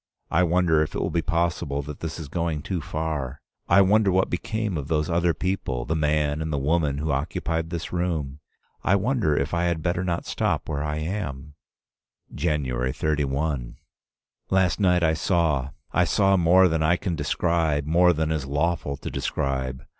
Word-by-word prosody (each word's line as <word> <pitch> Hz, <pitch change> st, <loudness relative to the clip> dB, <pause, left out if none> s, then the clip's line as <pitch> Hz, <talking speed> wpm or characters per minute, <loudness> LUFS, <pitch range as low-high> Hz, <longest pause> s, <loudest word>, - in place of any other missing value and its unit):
I 85 Hz, -, +3 dB
wonder 85 Hz, -2 st, +3 dB
if 75 Hz, -, -2 dB
it -, -, -2 dB
be 85 Hz, -, +2 dB
possible 85 Hz, -3 st, -1 dB
that 75 Hz, 0 st, -8 dB
this 80 Hz, -1 st, -5 dB
is 80 Hz, -, -6 dB
going 80 Hz, -1 st, -2 dB
too 90 Hz, -1 st, -3 dB
far? 75 Hz, -4 st, -3 dB, 0.3 s
I 95 Hz, +3 st, +7 dB
wonder 100 Hz, +1 st, +4 dB
what 95 Hz, +1 st, +1 dB
became 110 Hz, +2 st, -2 dB
of 70 Hz, -3 st, -4 dB
those 80 Hz, 0 st, 0 dB
other 85 Hz, -1 st, +2 dB
people, 70 Hz, -7 st, -2 dB
the 80 Hz, -, -1 dB
man 75 Hz, -1 st, +1 dB
and 80 Hz, 0 st, -3 dB
the 75 Hz, -, 0 dB
woman 75 Hz, 0 st, +1 dB
who 75 Hz, +2 st, -1 dB
occupied 80 Hz, +3 st, -2 dB
this 85 Hz, 0 st, -5 dB
room? 80 Hz, -6 st, -2 dB, 0.4 s
I 90 Hz, -, +3 dB
wonder 100 Hz, -, +1 dB
if -, -, -1 dB
I 85 Hz, 0 st, +1 dB
had 85 Hz, -3 st, -1 dB
better 85 Hz, 0 st, 0 dB
not 85 Hz, -2 st, -2 dB
stop -, -, -1 dB
where 75 Hz, -3 st, -2 dB
I 75 Hz, 0 st, -2 dB
am? 75 Hz, -4 st, -4 dB, 0.8 s
"January 65 Hz, -5 st, -1 dB
31. 70 Hz, -3 st, -1 dB, 0.7 s
Last 95 Hz, -2 st, +2 dB
night 90 Hz, -3 st, +3 dB
I 80 Hz, -1 st, +3 dB
saw 80 Hz, -6 st, +1 dB
— -, -, -42 dB
I 90 Hz, -, +3 dB
saw 95 Hz, +4 st, +3 dB
more 90 Hz, +1 st, +5 dB
than 80 Hz, -2 st, 0 dB
I 80 Hz, +3 st, +3 dB
can 90 Hz, -3 st, -2 dB
describe, 75 Hz, 0 st, 0 dB
more 90 Hz, +3 st, +4 dB
than 80 Hz, -1 st, -1 dB
is 75 Hz, -4 st, -2 dB
lawful 75 Hz, 0 st, -1 dB
to -, -, -6 dB
describe. 65 Hz, -1 st, -2 dB
80 Hz, 180 wpm, -25 LUFS, 75-85 Hz, 0.8 s, I